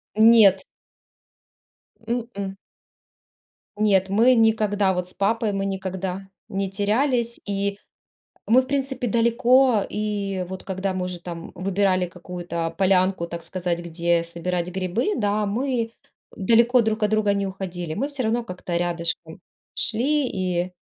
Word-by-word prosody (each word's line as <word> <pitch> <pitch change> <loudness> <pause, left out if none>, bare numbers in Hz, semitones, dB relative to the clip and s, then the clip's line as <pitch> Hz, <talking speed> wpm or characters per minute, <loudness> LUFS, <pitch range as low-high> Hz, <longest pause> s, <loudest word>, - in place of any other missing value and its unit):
Нет. 220 -3 +6 1.4
М-м. 225 -5 -3 1.2
Нет, 195 -3 +3
мы 230 +6 +5
никогда 215 -3 +2
вот 180 0 -3
с - - -11
папой, 220 +2 0
мы 195 0 -2
никогда 190 0 -4 0.2
не 195 0 -2
терялись. 235 +4 0
И 200 0 -2 0.7
мы, 250 +4 +5
в - - -11
принципе, 270 -2 -1
далеко 235 +1 +3
И 200 -3 -2
вот 190 0 -7
когда 190 0 -2
мы 185 -1 -2
уже, 180 -1 -5
там, 170 -1 -8
выбирали 185 0 +1
какую-то 175 -2 -5
полянку, 185 -1 +2
так 170 0 -6
сказать, 180 -2 -2
где 170 0 0
собирать 170 +1 -3
грибы, 190 - -1
да, 210 -2 0
мы 230 +1 -1 0.4
далеко 235 +4 +4
друг 220 0 -1
от 210 - +1
друга 215 -1 +2
не 200 0 -1
уходили. 180 -4 -5
Мы 275 - -1
всё 280 -3 -3
равно 230 +2 +1
как-то 180 -5 -5
рядышком 170 -1 -2 0.3
шли. 270 +5 +2
И 185 -2 -2
195 Hz, 130 wpm, -23 LUFS, 180-230 Hz, 1.4 s, Нет